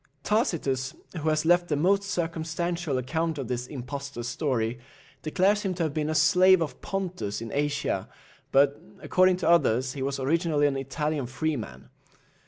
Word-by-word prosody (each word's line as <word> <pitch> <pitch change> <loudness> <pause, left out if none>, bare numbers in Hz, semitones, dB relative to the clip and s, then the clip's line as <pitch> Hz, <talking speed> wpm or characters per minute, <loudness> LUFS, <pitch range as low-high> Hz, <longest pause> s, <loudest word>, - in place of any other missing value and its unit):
Tacitus, 155 - 0 0.2
who 160 -1 -1
has 155 0 +1
left 175 +1 +4
the 150 - 0
most 190 +7 +3
circumstantial 170 -3 -2
account 160 +5 -1
of 135 -4 -4
this 125 0 -3
impostor's 135 -2 -6
story, 120 -5 -1 0.4
declares 190 +8 +2
him 190 -3 -2
to 170 - -1
have 155 -3 -1
been 155 0 -1
a 155 - -1
slave 180 +5 +6
of 165 -3 -4
Pontus 185 - -3
in 115 0 -7
Asia; 145 0 -1 0.4
but, 140 +1 +3 0.2
according 185 0 +4
to 180 - -2
others, 130 -7 +3
he 140 - -6
was 135 +1 -2
originally 155 +2 +1
an 140 -1 +2
Italian 140 +1 -2
freeman. 130 - -4
155 Hz, 160 wpm, -27 LUFS, 135-170 Hz, 0.4 s, slave